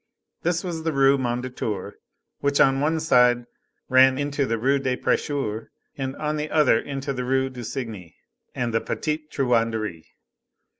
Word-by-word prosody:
This 175 0 0
was 170 -3 -4
the 160 0 -1
Rue 135 -1 +4
Mondétour, 120 -5 -3 0.5
which 140 0 +1
on 135 0 +5
one 155 +3 +1
side 125 -6 +4 0.4
ran 130 0 +5
into 145 -1 -1
the 115 - 0
Rue 135 +5 +2
de 130 -2 -1
Prêcheurs, 125 -7 -1 0.3
and 135 -1 -4
on 150 0 -2
the 150 0 -3
other 150 -7 +4
into 140 0 -4
the 125 -1 -3
Rue 130 +1 0
du 125 -1 -8
Cygne 110 -9 -6 0.4
and 120 -2 -2
the 115 - +2
Petite 155 0 -3
Truanderie. 115 - 0
130 Hz, 155 wpm, -24 LUFS, 120-145 Hz, 0.5 s, on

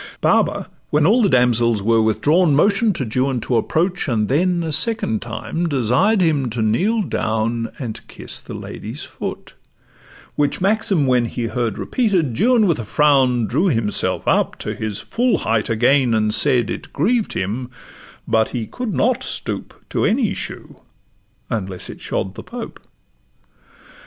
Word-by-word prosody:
Baba, - - +1 0.2
when 150 0 +2
all 230 +8 +4
the 205 - +3
damsels 120 - +2
were 115 +1 +3
withdrawn, 150 - +3
Motion'd 200 +6 +3
to 130 - -2 0.2
Juan 135 -2 -1
to 125 - -1
approach, 170 - 0
and 110 -5 0
then 175 +5 +1
A 160 - -3
second 155 - +1
time 120 +9 -3
desired 140 - +2
him 150 -7 +1
to 115 0 -2
kneel 200 - +1
down, 115 - -1
And 120 -6 -6
kiss - - -7
the - - -9
lady's - - -7
foot; - - -7 0.8
which 145 -1 +1
maxim 195 -5 +2
when 125 -2 +2
He 120 +1 -4
heard 115 0 -2
repeated, 185 - 0
Juan 235 - +3
with 170 -8 +1
a - - -3
frown 130 -1 +3
Drew 155 - +1
himself 115 - 0
up - - +1
to - - -4
his 110 -2 -4
full 245 +1 +1
height 110 0 -1
again, 120 +2 +3
And 110 -1 +1
said, 120 -4 +3
'It - - -7
grieved 220 - 0
him, 115 +7 -3 0.6
but 110 0 +2
he 120 -3 -3
could 240 - -5
not 250 +2 +1
stoop - - -6
To - - 0
any 220 0 +1
shoe, - - -7 0.7
unless 95 -4 -4
it - - -13
shod 95 - -3
the - - -8
Pope. 240 -1 -8
135 Hz, 155 wpm, -20 LUFS, 115-185 Hz, 0.8 s, all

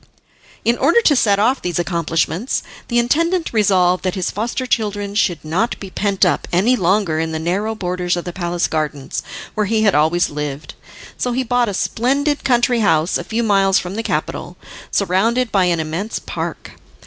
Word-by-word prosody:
In 235 +1 +2
order 345 - +4
to 305 -10 +4
set 205 -5 +3
off 245 +6 +2
these 175 -1 -2
accomplishments, 170 - -1 0.2
the 240 - 0
intendant 330 +8 +1
resolved 185 -4 +3
that 185 0 -1
his 185 -2 -2
foster 235 +5 -3
children 205 -4 -1
should 175 -7 0
not 185 +10 -1
be 195 -2 -8
pent 200 -1 +1
up - - 0
any 205 +9 +3
longer 185 -5 +1
in 160 0 -2
the - - -1
narrow 195 +7 -1
borders 180 -2 -1
of 175 - -4
the 175 - -5
palace 175 -1 -1
gardens, 150 -3 -3 0.3
where 210 -2 0
he 220 +1 +1
had 205 - +4
always 160 +4 +2
lived, 145 0 -5 0.5
so 245 - -1
he 260 +2 0
bought 245 -1 +1
a 200 - -3
splendid 280 +8 0
country 245 -2 +2
house 170 -5 +2
a - - -4
few 230 +1 -2
miles 195 -3 +3
from 180 +1 -3
the 220 - -2
capital, - - -3 0.3
surrounded 220 +6 +1
by 190 -3 +3
an 170 -2 +1
immense 165 +8 -3
park. - - -5
200 Hz, 185 wpm, -19 LUFS, 175-235 Hz, 0.5 s, order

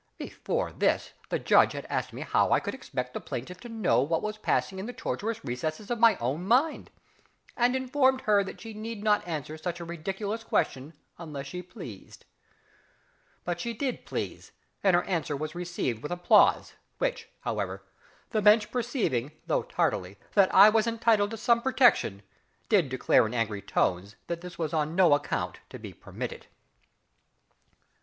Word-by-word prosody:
Before - - -3
this - - 0 0.2
the - - 0
Judge - - +4
had - - -6
asked - - -2
me - - -8
how - - +2
I - - +5
could - - -4
expect 125 - -5
the - - -3
plaintiff 170 +9 -6
to 240 - -10
know 220 - +2
what 160 +4 0
was 215 0 -4
passing 190 -2 0
in 195 - -5
the 245 - -6
tortuous 225 0 -4
recesses 155 - -4
of 240 - -1
my 230 -2 +6
own 135 +7 -2
mind, 255 +10 +2 0.7
and 245 +1 +2
informed 260 0 +2
her 205 -3 +3
that 195 - -8
she 225 -1 -8
need 215 0 -6
not 210 -3 +2
answer 155 -1 -5
such 175 +1 -4
a 170 - -6
ridiculous 195 +6 -4
question 140 -7 -1 0.3
unless 150 -5 -6
she 180 +6 -6
pleased. 175 - -11 1.2
But 175 -1 -3
she 235 +4 -3
did 260 +2 -3
please, - - -5 0.3
and 190 -3 +5
her 175 - +3
answer 160 -5 -2
was 155 +2 -4
received 175 -10 -3
with 150 - -6
applause, 175 0 +4 0.2
which, - - -2
however, - - -3 0.5
the 215 - +1
Bench 210 +1 +5
perceiving, 225 - -1
though - - +1
tardily, 95 +2 -1 0.2
that 195 -2 +5
I 200 +2 +9
was 220 +1 +2
entitled 225 -3 +2
to 225 - -6
some 235 +1 +3
protection, 245 - +3 0.5
did 185 -10 +3
declare 130 -3 +3
in 115 - -6
angry 110 -3 -1
tones 95 +3 -1
that 170 0 -5
it 180 -1 -9
was 160 -2 -2
on 155 0 0
no 175 -5 +6
account 145 0 -1
to - - -8
be - - -9
permitted. - - -7
185 Hz, 170 wpm, -28 LUFS, 150-225 Hz, 1.2 s, I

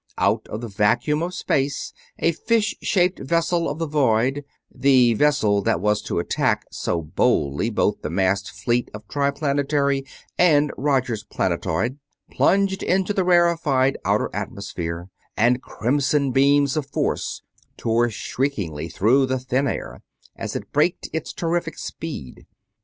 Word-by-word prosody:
Out - - +1
of 105 - -6
the 120 - -5
vacuum 115 +9 +1
of 175 +2 -3
space 140 -5 -1 0.2
a 165 - +2
fish 215 +6 0
shaped 180 -2 +1
vessel 170 +3 0
of 145 - -4
the 165 - -1
void 135 -2 +1 0.3
the 130 -2 +4
vessel 110 -6 +2
that 85 - +1
was 105 +2 +1
to - - -4
attack 85 - 0
so 85 -2 -2
boldly 70 -2 +1
both - - 0
the - - -4
massed 95 +3 0
fleet 120 0 -1
of 105 0 -10
Triplanetary 140 -1 0 0.4
and 150 -4 +4
Roger's 130 -6 0
planetoid 115 - -1 0.3
plunged 195 0 +2
into 190 +2 +1
the 195 - +1
rarefied 170 -7 +3
outer - - +1
atmosphere, 85 -3 -5 0.3
and 120 +3 +3
crimson 140 +2 0
beams 140 +1 +3
of 150 -3 -2
force - - -2 0.3
tore 120 +1 +1
shriekingly 100 - -3
through 120 - +3
the 130 0 0
thin 130 +2 0
air - - -5 0.3
as - - -5
it - - -6
braked 155 +5 +1
its 160 0 -3
terrific 170 0 -2
speed. 145 - -7
135 Hz, 140 wpm, -23 LUFS, 110-150 Hz, 0.4 s, the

